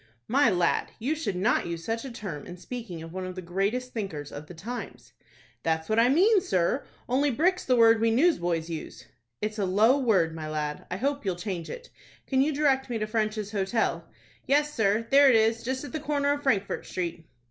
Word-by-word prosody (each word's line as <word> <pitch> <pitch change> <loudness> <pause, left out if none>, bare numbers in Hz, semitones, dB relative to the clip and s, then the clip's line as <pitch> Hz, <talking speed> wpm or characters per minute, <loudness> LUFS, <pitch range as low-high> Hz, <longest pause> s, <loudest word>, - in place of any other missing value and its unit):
"My 265 +1 +4
lad, 180 -4 +1
you 260 +7 -1
should 310 - -3
not 200 +2 +1
use 170 -1 -5
such 225 0 -2
a 265 - -6
term 185 -11 -7
in 175 - -8
speaking 190 -5 -7
of 165 +1 -10
one 185 0 -4
of 185 0 -6
the 185 - -5
greatest 200 +9 -2
thinkers 160 -10 -5
of 145 +1 -8
the 180 - -10
times." 230 +9 -7 0.5
"That's 160 0 -1
what 220 +1 +3
I 235 +2 +5
mean, 385 - +5
sir; 185 - 0 0.2
only 275 +4 +2
brick's 350 +8 +1
the 255 - +3
word 225 -1 +5
we 230 - +3
newsboys 175 - +2
use." 165 -2 -7 0.4
"It's 215 +1 -2
a 200 - +1
low 215 +9 +4
word, 190 -11 +2
my 155 -1 -6
lad; 150 -1 -4
I 180 - -3
hope 280 +5 -1
you'll 190 -3 -1
change 175 -2 -5
it. - - -8 0.3
Can 265 -1 +2
you 295 +3 +2
direct 275 -3 +1
me 235 - -1
to 215 - -1
French's 215 -1 -2
Hotel?" 210 +2 -1 0.4
"Yes, 295 +2 +2
sir; 220 -1 +1
there 280 0 +7
it 250 - +5
is, 225 +1 +3
just 260 +2 -3
at 285 - -7
the 310 - -3
corner 285 -1 0
of 290 - -4
Frankfort 205 -8 0
Street." 170 -2 -4
220 Hz, 215 wpm, -27 LUFS, 180-265 Hz, 0.5 s, there